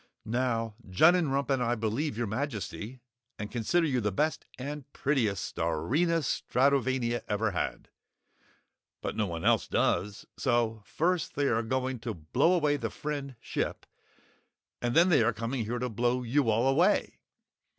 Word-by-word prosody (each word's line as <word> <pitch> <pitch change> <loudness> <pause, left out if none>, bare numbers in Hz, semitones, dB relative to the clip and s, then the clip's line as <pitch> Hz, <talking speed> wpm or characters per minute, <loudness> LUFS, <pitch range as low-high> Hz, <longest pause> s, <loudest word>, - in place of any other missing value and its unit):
"Now 115 -1 -1 0.2
Junnenrump 140 - +3
and 135 -2 +2
I 120 0 +1
believe 115 +4 -2
your 120 - 0
Majesty, 115 0 -4 0.4
and 105 -1 -6
consider 145 +9 +1
you 130 -5 +1
the 105 -1 0
best 155 +11 -1
and 140 +1 -6
prettiest 125 -8 0
Starina 125 - +1
Stratovania 130 -3 +1
ever 105 +1 0
had! 90 - -3 1.2
But - - -3
no 105 - 0
one 85 -2 -5
else - - +3
does, 100 +3 0
so 120 -4 +1
first 175 0 0
they 145 -1 +1
are 115 0 +2
going 130 +2 -2
to 115 -2 -4
blow 125 - +2
away 150 -4 +2
the - - -3
Friend 140 -3 -5
Ship - - -3 1.0
and 120 +1 -1
then 170 +3 +6
they 165 - +5
are 115 +1 +2
coming 115 +2 -3
here 120 +3 -2
to 125 +1 -1
blow 120 +2 0
you 125 +1 +1
all 115 +4 +2
away! 170 +10 +2
125 Hz, 150 wpm, -29 LUFS, 110-145 Hz, 1.2 s, then